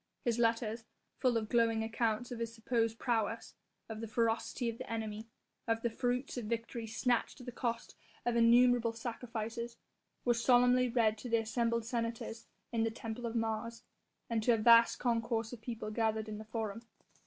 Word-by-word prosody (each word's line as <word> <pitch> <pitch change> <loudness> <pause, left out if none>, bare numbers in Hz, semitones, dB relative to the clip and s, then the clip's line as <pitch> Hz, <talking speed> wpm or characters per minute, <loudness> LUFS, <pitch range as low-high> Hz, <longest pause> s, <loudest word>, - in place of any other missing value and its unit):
His 235 -1 +1
letters, 230 -1 +1 0.4
full 250 -3 +3
of 220 -1 -2
glowing 230 -1 +2
accounts 225 +1 -1
of 240 - -5
his 230 -1 -2
supposed 230 -1 0
prowess, 230 -2 -1 0.3
of 220 -1 -6
the 225 - -4
ferocity 230 +2 0
of 230 0 -3
the - - -7
enemy, 220 -1 -4 0.4
of 225 0 0
the 235 - +1
fruits 250 +3 -1
of 240 - -3
victory 230 +1 -3
snatched 240 +3 0
at 250 - -10
the 245 - -5
cost 235 -1 -3 0.3
of 240 -1 +1
innumerable 235 0 +5
sacrifices 230 0 -5 0.5
were 240 - +4
solemnly 245 +1 +4
read 225 -3 +2
to 245 - -6
the 230 - +4
assembled 230 0 0
senators 230 -1 -3 0.2
in 230 -2 0
the 225 - +2
temple 225 +1 -5
of 230 - -5
Mars, 230 +1 -2 0.4
and 230 -2 0
to 235 +2 +4
a - - -1
vast 230 +1 +6
concourse 230 -1 0
of 235 - -8
people 220 -2 -5
gathered 220 -1 0
in 210 -1 -5
the 220 - -8
Forum. 220 -1 -4
230 Hz, 175 wpm, -34 LUFS, 225-240 Hz, 0.5 s, vast